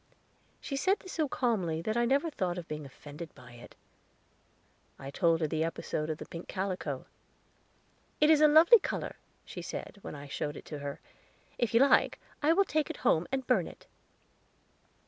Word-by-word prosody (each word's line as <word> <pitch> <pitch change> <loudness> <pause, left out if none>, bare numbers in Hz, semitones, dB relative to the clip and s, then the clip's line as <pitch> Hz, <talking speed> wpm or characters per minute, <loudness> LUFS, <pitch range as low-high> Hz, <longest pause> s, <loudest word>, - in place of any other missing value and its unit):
She 275 - -5
said 380 +8 +2
this 370 - -10
so 310 -4 0
calmly 195 -13 0
that 215 +3 -1
I 240 0 +3
never 280 +6 +2
thought 180 -9 -2
of 175 -2 -6
being 150 -2 -5
offended 150 +4 -10
by 125 -4 -14
it. 120 0 -13 1.2
I 135 +1 -8
told 165 +1 +2
her 155 - +2
the 160 +1 0
episode 160 -1 -3
of 155 - -2
the - - -8
pink 170 +1 -8
calico. 190 -1 -3 1.1
"It 300 +1 +6
is 305 -1 +5
a 305 - +8
lovely 325 +10 +8
color," - - -4 0.3
she - - -7
said, 200 - -7
when - - -7
I 145 0 -9
showed 145 +1 -4
it - - -11
to 150 - -6
her. 140 0 -5 0.6
"If 235 -1 0
you 235 - +6
like, 275 - +4 0.2
I 305 +2 +4
will 395 +4 +4
take 310 -4 0
it - - -5
home 160 +2 +3
and 265 -1 -1
burn 230 -10 +2
it." - - -13
185 Hz, 185 wpm, -31 LUFS, -, 1.2 s, a